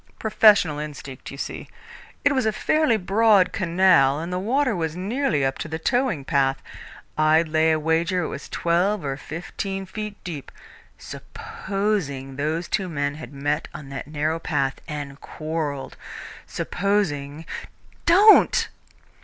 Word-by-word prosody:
Professional 205 -8 +4
instinct, 140 -3 -7
you 135 - -9
see. - - -6 0.6
It 285 - +6
was 260 -4 +1
a - - +3
fairly 280 +2 +2
broad 200 0 +4
canal, 170 -7 +3
and 170 +3 -4
the 180 - -1
water 255 +4 +1
was 160 -2 -2
nearly 195 - 0
up 135 0 -2
to - - -4
the 160 0 -4
towing 225 - 0
path. 135 -1 +1 0.6
I'd 155 +2 +4
lay 160 +1 +3
a 160 - +3
wager 165 +3 +1
it - - -2
was 140 - -7
twelve 175 +2 +1
or 135 -1 -2
fifteen 190 +6 -5
feet 210 +2 -6
deep. 160 -7 -7 0.5
Supposing 180 -10 -4
those 155 +5 -2
two 190 -3 -1
men 145 -3 -1
had 155 0 -9
met 145 +2 -2
on 140 -2 -8
that 135 0 -6
narrow 155 +2 -1
path 140 -5 -1
and 145 -3 -6
quarrelled! 155 -3 -4 0.5
Supposing 165 -7 -1 0.3
" - - -31
"Don't!" 430 +6 +6
165 Hz, 145 wpm, -24 LUFS, 145-200 Hz, 0.6 s, It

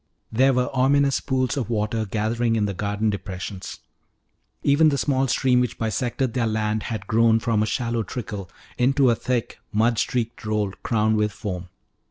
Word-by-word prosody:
There 130 +4 +4
were 125 +1 0
ominous 140 +1 +3
pools 130 -2 0
of 120 -5 -2
water 110 0 -1
gathering 115 +3 0
in 105 -2 +1
the 100 - -2
garden 105 +3 -1
depressions. 95 -1 -6 0.8
Even 150 +3 +5
the 140 - 0
small 135 -1 +1
stream 125 0 +3
which 125 -1 -2
bisected 120 +3 -1
their 120 -3 +1
land 110 0 0
had 110 -3 -4
grown 115 +1 +4
from 115 -2 +1
a 110 - +1
shallow 115 -1 -1
trickle 105 -5 -6 0.3
into 135 0 +4
a - - +2
thick, 120 0 -2
mud 115 +2 +2
streaked 120 -1 -2
roll 105 -2 -1
crowned 110 -1 +1
with 105 0 +1
foam. 90 -4 -5
115 Hz, 170 wpm, -24 LUFS, 105-125 Hz, 0.8 s, Even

